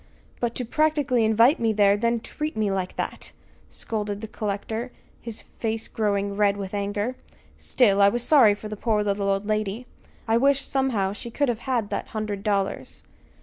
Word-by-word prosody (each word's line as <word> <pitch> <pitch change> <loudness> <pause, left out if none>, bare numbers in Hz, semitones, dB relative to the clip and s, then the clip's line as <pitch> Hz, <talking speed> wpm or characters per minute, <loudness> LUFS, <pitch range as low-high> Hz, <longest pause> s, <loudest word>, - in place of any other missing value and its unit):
But 235 -1 -1
to 250 - -2
practically 295 -3 +2
invite 230 +6 +4
me 225 -1 +1
there, 205 -1 +4
and 205 - -2
then 235 0 +2
treat 300 +2 -5
me 210 -2 +1
like 190 -1 -2
that!" - - -4 0.4
scolded 210 -2 -3
the 220 - -6
collector, 220 +3 -4 0.3
his 230 -2 -7 0.2
face 225 -1 -1
growing 200 -2 -1
red 200 -1 +2
with 195 -1 -6
anger. 205 +4 -2 0.4
"Still, 205 -6 +2
I 200 - +7
was 240 +3 -1
sorry 245 -7 +6
for 215 - -8
the 215 - -5
poor 210 0 0
little 200 -1 0
old 195 +1 0
lady. 215 +2 -2 0.4
I 225 +1 +3
wish, 275 +2 +3
somehow, 235 -8 0
she 220 +3 -7
could 285 +3 0
have 240 -2 -1
that - - -3
hundred 215 -2 -4
dollars!" 200 -2 -2
215 Hz, 180 wpm, -25 LUFS, 205-240 Hz, 0.4 s, I